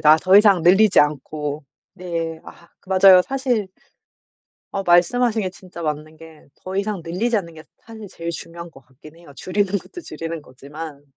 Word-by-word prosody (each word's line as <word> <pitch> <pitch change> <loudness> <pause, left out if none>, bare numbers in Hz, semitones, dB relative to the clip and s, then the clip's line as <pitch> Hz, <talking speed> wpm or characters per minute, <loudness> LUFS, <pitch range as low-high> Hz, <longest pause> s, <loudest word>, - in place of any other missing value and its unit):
나 155 +1 +6
더 185 +4 +4
이상 200 -4 +5
늘리지 190 +4 +5
않고. 150 0 -2 0.3
네. 165 -3 -5
아 170 - -15
그 - - -24
맞아요. 190 -1 +7
사실 250 -4 -2 1.1
어 195 - -1
말씀하신 215 +6 +2
게 185 - -3
진짜 180 -2 -12
맞는 155 0 -4
게 160 -1 -16 0.2
더 185 - -6
이상 200 -3 -3
늘리지 210 +8 -1
않는 170 -5 -4
게 155 - -12
사실 220 -2 -12
제일 170 -1 -6
중요한 170 0 -9
것 135 - -17
같긴 135 +5 -18
해요 170 -4 -16
줄이는 200 +1 -1
것도 275 - -9
줄이는 165 - -7
거지만. 145 +2 -10
170 Hz, 320 characters per minute, -21 LUFS, 155-200 Hz, 1.1 s, 맞아요